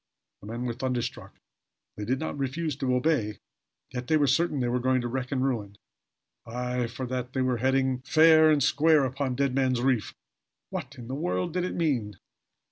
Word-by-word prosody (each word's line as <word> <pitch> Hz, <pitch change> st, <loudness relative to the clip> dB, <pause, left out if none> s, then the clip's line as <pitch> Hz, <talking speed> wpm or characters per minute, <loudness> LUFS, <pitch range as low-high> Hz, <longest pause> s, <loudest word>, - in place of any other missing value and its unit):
The -, -, -11 dB
men 115 Hz, +3 st, -4 dB
were 120 Hz, -, -1 dB
thunderstruck. 125 Hz, -1 st, -4 dB, 0.6 s
They 105 Hz, -, -5 dB
did 130 Hz, +5 st, 0 dB
not 160 Hz, +1 st, -4 dB
refuse 145 Hz, +2 st, -2 dB
to 130 Hz, -2 st, 0 dB
obey, 125 Hz, -6 st, +1 dB, 0.5 s
yet 125 Hz, -1 st, -5 dB
they 155 Hz, -, +4 dB
were 145 Hz, -, +3 dB
sure 140 Hz, +6 st, +3 dB
they 135 Hz, -7 st, -2 dB
were 125 Hz, +1 st, 0 dB
going 130 Hz, +1 st, +2 dB
to 120 Hz, -, -3 dB
wreck 130 Hz, +2 st, -3 dB
and 130 Hz, -1 st, 0 dB
ruin. 105 Hz, -6 st, -2 dB, 0.7 s
Aye 125 Hz, +1 st, -2 dB
for 125 Hz, +3 st, -5 dB
they 125 Hz, +1 st, -3 dB
were 130 Hz, -1 st, +1 dB
heading 130 Hz, +1 st, +1 dB
fair 155 Hz, +3 st, +6 dB
and 150 Hz, -3 st, +3 dB
square 155 Hz, 0 st, +4 dB
upon 130 Hz, 0 st, -2 dB
Dead 140 Hz, 0 st, 0 dB
Man's 130 Hz, -2 st, +1 dB
Reef! 125 Hz, -4 st, 0 dB, 0.6 s
What -, -, -5 dB
in 120 Hz, -3 st, -10 dB
the 130 Hz, -, -5 dB
world 90 Hz, -10 st, -2 dB
did 180 Hz, 0 st, 0 dB
it -, -, -4 dB
mean? 125 Hz, -, 0 dB
130 Hz, 190 wpm, -27 LUFS, 120-140 Hz, 0.7 s, fair